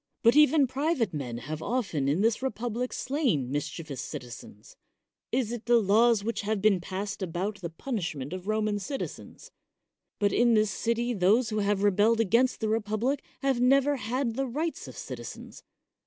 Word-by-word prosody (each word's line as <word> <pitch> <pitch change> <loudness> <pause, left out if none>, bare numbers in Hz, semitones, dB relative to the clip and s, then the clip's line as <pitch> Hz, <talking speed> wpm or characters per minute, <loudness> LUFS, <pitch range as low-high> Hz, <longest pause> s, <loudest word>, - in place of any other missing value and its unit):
But 230 +2 +5
even 300 -1 +6
private 260 - 0
men 125 -6 -4
have 150 +6 -6
often 180 - -1
in 150 +7 +1
this 225 +2 +2
republic 245 -1 -2
slain 245 - -1
mischievous 145 -1 -4
citizens. 115 -3 -9 0.6
Is 245 -2 0
it 240 -2 -5
the 240 0 +6
laws 220 +1 +4
which 230 +2 -2
have 215 0 -1
been 195 -3 +3
passed 200 +3 -5
about 190 +4 -3
the 170 - -4
punish 185 - -4
ment 140 +3 -6
of 185 +1 -7
Roman 215 -1 0
citizens? 270 +8 -7 0.7
But 205 -1 +1
in 240 -1 +4
this 215 -1 +3
city 235 +3 -1
those 215 +5 +3
who 215 - 0
have 200 -1 +1
rebelled 205 +3 +3
against 230 +5 +2
the 220 - 0
republic 225 +5 -1 0.2
have 270 -3 +1
never 275 +3 +4
had 245 +1 -2
the 270 +3 -2
rights 310 +7 -3
of - - -10
citizens. - - -8
215 Hz, 170 wpm, -28 LUFS, 190-245 Hz, 0.7 s, even